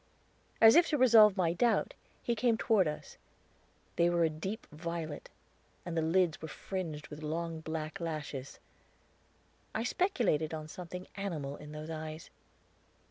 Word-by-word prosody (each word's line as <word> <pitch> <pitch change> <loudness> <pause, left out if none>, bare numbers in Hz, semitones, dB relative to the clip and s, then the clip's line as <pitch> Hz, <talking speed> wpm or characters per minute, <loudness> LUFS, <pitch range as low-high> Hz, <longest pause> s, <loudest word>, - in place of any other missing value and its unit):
As 225 +1 +8
if 340 0 +6
to 300 - +1
resolve 220 -5 +7
my 170 -3 +2
doubt, 235 +4 +2 0.3
he 240 - +1
came 230 0 +2
toward 210 -6 +3
us; 150 - -6 0.8
they 170 0 +4
were 170 -1 +2
a 160 - +2
deep 190 +8 -5
violet, 160 -1 -5 0.6
and 175 -2 -4
the 165 - +2
lids 165 +1 +2
were 160 - -5
fringed 160 -4 -5
with 150 0 -9
long 165 +1 -3
black 160 +2 -5
lashes. 150 -5 -5 1.2
I 220 - 0
speculated 235 - +1
on 155 -1 -6
something 180 +2 -7
animal 155 -8 -3
in 150 0 -11
those 155 +1 -7
eyes. 155 0 -6
165 Hz, 145 wpm, -32 LUFS, 155-200 Hz, 1.2 s, As